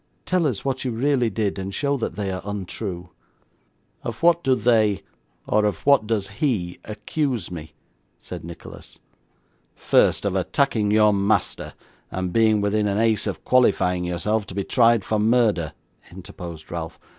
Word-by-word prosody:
Tell 180 -4 +2
us 125 -5 -3
what 135 -1 -1
you 130 - -1
really 125 +1 +1
did, 105 -2 -2
and 95 +1 -4
show 140 +7 0
that 120 - -3
they 100 -2 -2
are 95 - -4
untrue.' 95 -2 -5 0.9
'Of 115 +5 -6
what 170 0 +4
do 130 -1 +3
they 110 -3 +2 0.4
or 105 - +2
of 105 -1 -1
what 140 -6 +4
does 105 -4 -1
he 100 - -2
accuse 110 - -3
me?' 80 -3 -8 0.4
said - - -8
Nicholas. 85 +1 -11 0.8
'First, - - +2
of 100 -2 0
attacking 110 +2 +1
your 105 0 +5
master, 100 +2 0 0.3
and 90 -1 -3
being 110 -2 +3
within 105 +1 +1
an 100 0 0
ace 110 -1 +2
of - - -5
qualifying 95 -8 +3
yourself 95 +5 -1
to 95 - -9
be 100 - -1
tried 115 -1 +3
for 110 - 0
murder,' 110 -8 +2 0.4
interposed 85 -3 -10
Ralph. 85 -1 -5
105 Hz, 155 wpm, -23 LUFS, 95-115 Hz, 0.9 s, your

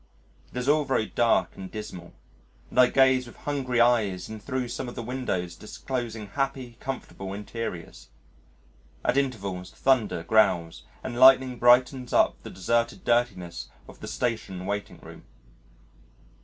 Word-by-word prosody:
It - - -8
is 125 +1 -2
all 150 +1 +4
very 130 -6 0
dark 120 0 +1
and 95 -1 -8
dismal, 90 -5 -8 0.6
and - - 0
I 125 - +8
gaze 130 -1 +3
with 120 - -13
hungry 130 -4 -2
eyes 110 -7 +2
in 110 0 -7
thro' 130 +3 -3
some 120 +1 -5
of - - -10
the 120 - -5
windows 115 -8 -3
disclosing 115 -1 -5
happy 135 -1 -3
comfortable 95 -7 -6
interiors. 105 -4 -6 1.0
At - - +2
intervals 100 -10 -2
thunder 115 -10 +1
growls 90 -5 +2 0.2
and 120 - -4
lightning 130 -1 +6
brightens 125 +1 +4
up - - +3
the - - -9
deserted 115 +6 -1
dirtiness 90 - 0 0.2
of - - -14
the - - -8
Station 110 -6 -3
Waiting 100 +1 -4
Room. - - -12
120 Hz, 140 wpm, -26 LUFS, 100-130 Hz, 1.0 s, I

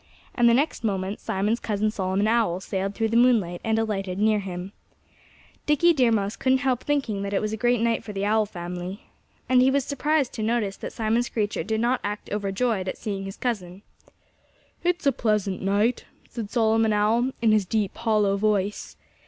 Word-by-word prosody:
And 240 -1 +4
the 235 - +5
next 280 -1 0
moment 195 -1 -2
Simon's 210 +5 -1
cousin 215 0 -1
Solomon 195 0 0
Owl 220 -6 +2
sailed 195 +1 -3
through 225 -1 0
the 230 - +2
moonlight 220 -8 +3
and 220 0 +1
alighted 195 -4 -2
near 215 +1 +3
him. 185 -1 -6 1.0
Dickie 320 +4 +4
Deer 250 -6 +3
Mouse 205 -1 0
couldn't 260 0 +2
help 255 -2 +1
thinking 270 -9 -1
that 200 0 -3
it - - +3
was 215 0 -2
a - - 0
great 240 +1 +1
night 230 0 +1
for 210 - -7
the 200 0 -2
Owl 215 0 +2
family. 180 +1 -6 0.4
And 255 -1 +4
he 260 - +5
was 275 0 +1
surprised 290 -1 0
to 225 - -5
notice 215 -3 0
that - - -6
Simon 225 +1 0
Screecher 215 -3 -2
did 220 0 -1
not 245 +2 +1
act 205 0 -5
overjoyed 200 0 -1
at - - -3
seeing 195 -2 -4
his 195 - -7
cousin. 200 -6 -4 1.0
"It's 350 -3 0
a 280 - +5
pleasant 210 -6 -1
night," 205 +5 +1 0.2
said 225 -4 -6
Solomon 225 -1 +2
Owl 225 +5 +2
in 225 -2 +3
his 210 -3 +2
deep, 210 -1 -1
hollow 210 -3 +2
voice. 205 -1 -1
215 Hz, 190 wpm, -25 LUFS, 195-235 Hz, 1.0 s, the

